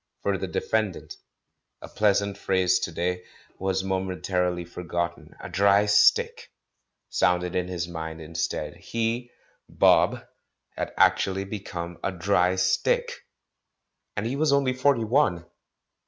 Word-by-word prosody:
"For - - +1
the - - -3
defendant," 110 -5 -2 0.6
a - - -10
pleasant 100 -1 +1
phrase 95 -1 +2
to - - -3
day, 90 +2 -2 0.4
was 95 0 -1
momentarily 90 -2 -1
forgotten; 85 0 -4
"a - - -7
dry 100 +1 +3
stick" 105 0 +3 0.6
sounded 90 0 +1
in 90 -1 0
his 90 -2 -3
mind 80 -1 -6
instead. 80 +1 -4
He, 115 +2 -2 0.4
*'Bob," - - +3 0.5
had - - -3
actually 95 0 +3
become 90 -4 -6
a 95 - 0
"dry 90 0 +1
stick"! 95 0 +1 1.1
And 100 - -1
he 120 +4 -2
was 150 0 +2
only 140 -2 +2
forty 130 -2 +2
one. 110 - +1
95 Hz, 125 wpm, -26 LUFS, 90-105 Hz, 1.1 s, dry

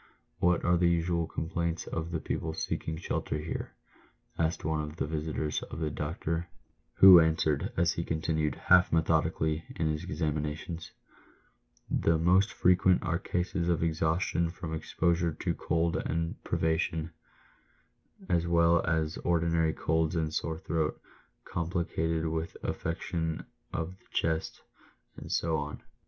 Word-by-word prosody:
What 90 0 +2
are 90 0 +4
the 85 0 +3
usual 85 -1 +1
complaints 85 +1 -2
of 80 +1 -4
the 85 -2 -2
people 80 +1 -3
seeking 80 0 -3
shelter 80 -2 -2
here 75 +2 -5 0.3
?" - - -31
asked 80 0 -3
one 80 0 0
of 75 0 -6
the - - -1
visitors 75 0 -2
of - - -8
the 80 -2 -2
doctor, 80 +3 -3 0.5
who 95 -2 +10
answered, 80 -2 +1
as 85 -1 +3
he 85 - -2
continued, 80 -1 -1
half 90 -1 +4
methodically, 80 -1 +1
his 80 -3 -1
examinations. 75 +2 -3 0.5
" - - -38
The 80 0 +4
most 90 +6 +4
frequent 90 0 +3
are 85 +1 0
cases 90 -2 -1
of 85 -1 +1
exhaustion 85 +1 +1
from 85 -2 -6
exposure 85 +1 0
to - - -2
cold 85 +1 0
and 85 -2 -2
privation, 80 0 0 1.2
as 85 -2 +1
well 85 0 +4
as 80 -2 0
ordinary 85 -1 +1
colds 80 +1 0
and 80 -2 -1
sore 80 -1 -2
throat, 80 -2 -1 0.5
complicated 80 -1 -1
with 80 0 -3
affection 80 -1 -3 0.3
of 85 +4 -4
the - - -30
chest, 80 -1 -1 0.5
and - - -8
so 80 -1 +1
on. 75 0 -5
80 Hz, 140 wpm, -30 LUFS, 80-85 Hz, 1.2 s, who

